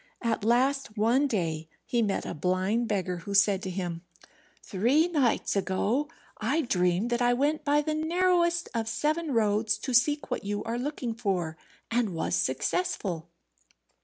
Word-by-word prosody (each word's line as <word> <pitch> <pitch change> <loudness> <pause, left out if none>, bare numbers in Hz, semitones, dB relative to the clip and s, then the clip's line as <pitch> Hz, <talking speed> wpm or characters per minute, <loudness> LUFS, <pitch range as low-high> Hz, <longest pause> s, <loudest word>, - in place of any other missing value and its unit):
At 225 -2 0
last, 245 0 +1
one 240 +7 +3
day 165 - -2 0.2
he 240 - 0
met 205 -3 -1
a - - -4
blind 185 +8 0
beggar, 190 -4 -1
who 200 +4 -5
said 200 -1 +4
to 190 - -4
him, 175 -2 -4 0.6
"Three 250 - +2
nights 285 -13 +1
ago 205 +9 0 0.3
I 265 +10 +1
dreamed 185 - +1
that 240 +1 0
I 245 0 +4
went 290 +4 0
by 295 +1 +2
the 310 +1 -1
narrowest 345 +2 +1
of 225 -2 -1
seven 305 +7 -1
roads 215 -2 +2
to 260 - -4
seek 290 +5 +2
what - - -2
you 205 +1 -3
are 230 +1 -3
looking 255 -3 -3
for, 185 -7 -2 0.4
and 225 -6 0
was 160 - -2
successful." 190 - -1
230 Hz, 160 wpm, -28 LUFS, 195-285 Hz, 0.6 s, said